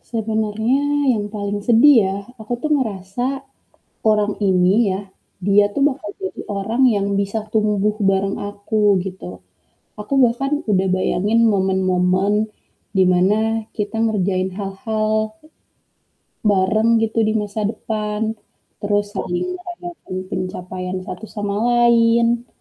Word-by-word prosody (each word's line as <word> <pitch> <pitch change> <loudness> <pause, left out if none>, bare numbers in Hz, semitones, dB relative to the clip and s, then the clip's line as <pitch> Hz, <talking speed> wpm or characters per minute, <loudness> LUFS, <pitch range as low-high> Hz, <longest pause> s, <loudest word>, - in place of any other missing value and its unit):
Sebenarnya 220 +2 -1 0.3
yang 205 -1 -2
paling 205 0 -3
sedih 245 +4 +6
ya, 190 +1 -2 0.2
aku 220 +3 -6
tuh 305 - -1
ngerasa 210 -2 -3 0.8
orang 210 -1 +2
ini 185 -1 +3 0.2
ya, 190 - -2 0.5
dia 205 +1 +5
tuh 280 - 0
bakal 260 -6 -9
jadi 190 - -5 0.2
orang 220 +6 -1
yang 200 0 0
bisa 200 +2 -2
tumbuh 210 -1 +1
bareng 195 0 +1
aku 205 0 +1
gitu. 95 - -8 0.6
Aku 210 +6 -3
bahkan 275 +5 0
udah 190 -1 +2
bayangin 205 +4 +1
momen-momen 190 +2 +1 0.5
dimana 185 +2 +4 0.4
kita 210 +1 -3
ngerjain 190 -4 0
hal-hal 215 +2 -2 1.1
bareng 210 +3 +3
gitu 225 +1 -1
di - - +1
masa 205 +1 -5
depan, 215 -1 -4 0.6
terus 205 0 0
saling 175 - -2
merayakan 350 - -8
pencapaian 185 0 -4
satu 185 +4 -7
sama 205 -1 -2
lain. 235 0 +3
210 Hz, 115 wpm, -20 LUFS, 190-225 Hz, 1.1 s, sedih